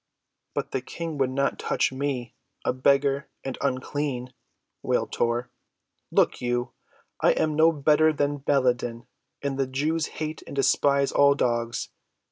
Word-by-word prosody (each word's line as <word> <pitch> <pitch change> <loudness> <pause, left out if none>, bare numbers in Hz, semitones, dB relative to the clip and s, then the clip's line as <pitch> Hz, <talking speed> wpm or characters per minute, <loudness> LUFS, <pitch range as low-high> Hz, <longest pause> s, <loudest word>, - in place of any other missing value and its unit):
"But - - -2
the 135 - -1
King 165 +2 -6
would 135 -1 +2
not 140 +1 0
touch - - +1
me—a 130 -3 -4
beggar, 140 +1 +2
and 135 - -4
unclean," 130 -1 -2 0.5
wailed - - 0
Tor. 120 +1 -1 0.6
"Look - - +2
you, 120 0 -1 0.5
I - - +4
am 155 - 0
no 160 +2 +6
better 155 +1 +4
than 145 -1 0
Baladan, 125 -4 0 0.4
and 140 -1 -2
the 135 - +1
Jews 155 +5 0
hate 155 -1 -4
and - - -7
despise 140 0 +3
all 140 0 +5
dogs. 120 -3 -1
140 Hz, 135 wpm, -26 LUFS, 125-145 Hz, 0.6 s, no